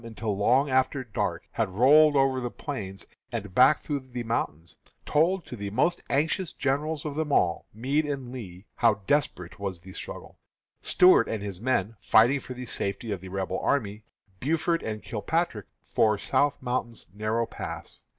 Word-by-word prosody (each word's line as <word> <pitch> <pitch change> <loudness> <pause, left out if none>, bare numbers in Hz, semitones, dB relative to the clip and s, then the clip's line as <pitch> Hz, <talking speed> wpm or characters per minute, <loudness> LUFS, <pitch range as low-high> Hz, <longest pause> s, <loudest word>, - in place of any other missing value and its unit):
until 110 -2 -3
long 125 +8 +3
after 130 0 +1
dark, 115 -5 -2
had - - -1
rolled 145 +9 +6
over 135 -1 +3
the 120 - -2
plains 100 -9 -6 0.3
and 105 -5 -5
back 130 +6 +5
through 145 -2 -2
the 125 -2 -6
mountains, 85 -8 -3 0.3
told 170 +5 +2
to - - -7
the 100 -3 -5
most 170 - +1
anxious 160 +5 0
generals 145 +3 -1
of 150 - -3
them 155 0 -2
all, 85 -10 +2
Meade 140 +8 0
and 135 -4 -4
Lee, 100 -7 -9
how 115 -3 +4
desperate 140 - 0
was 95 -3 -4
the 95 +1 -12
struggle - - -9 0.4
Stuart 180 -10 +5
and 110 -2 -3
his 100 -2 -6
men 115 -4 0
fighting 115 +7 +4
for 125 -1 -8
the 125 0 -6
safety 105 0 -3
of 95 -3 -3
the 95 - -9
Rebel 95 0 -2
army, 105 -6 -1 0.4
Buford 165 +4 0
and 110 -1 -5
Kilpatrick 115 - -2 0.2
for 105 -1 +2
South 145 +7 +1
Mountain's 125 -2 -3
narrow 110 +3 0
Pass. - - -8
120 Hz, 170 wpm, -27 LUFS, 105-140 Hz, 0.4 s, rolled